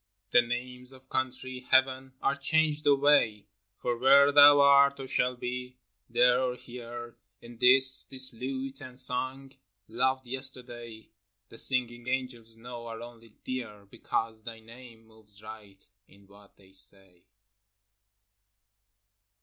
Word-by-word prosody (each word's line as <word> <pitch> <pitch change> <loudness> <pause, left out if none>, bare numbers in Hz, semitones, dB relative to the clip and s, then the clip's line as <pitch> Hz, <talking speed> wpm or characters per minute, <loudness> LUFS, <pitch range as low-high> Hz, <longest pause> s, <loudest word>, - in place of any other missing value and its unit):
The 120 - +5
names 125 +2 -7
of 130 0 -20
country, 130 0 -5
heaven, 130 0 0
are 140 - -1
changed 155 -1 -2
away, 140 -7 +1 0.3
For 120 -1 -5
where 140 +2 +4
thou 145 0 +6
art 140 0 +3
or 135 - -9
shalt 125 -1 -3
be, 125 +1 -7 0.3
there 125 +1 +2
or 125 -1 -3
here; 120 -1 -12 0.2
And 120 -1 -16
this 130 +1 +7
— - - -20
this 130 -1 +3
lute 135 +3 -8
and 130 -3 -11
song 130 +1 +1 0.2
— 100 0 -57
loved 130 +3 -3
yesterday, 120 -4 -1 0.4
(The 115 - -12
singing 120 -2 +3
angels 120 -3 -4
know) 120 0 -11
are 115 -1 -9
only 115 -1 -15
dear, 115 -6 -8
Because 110 -1 -5
thy 115 0 -11
name 115 0 -17
moves 110 -2 -22
right 105 -3 -15 0.2
in 100 0 -23
what 100 +1 -22
they 95 -1 -24
say. 95 -2 0
125 Hz, 135 wpm, -26 LUFS, 115-130 Hz, 0.4 s, this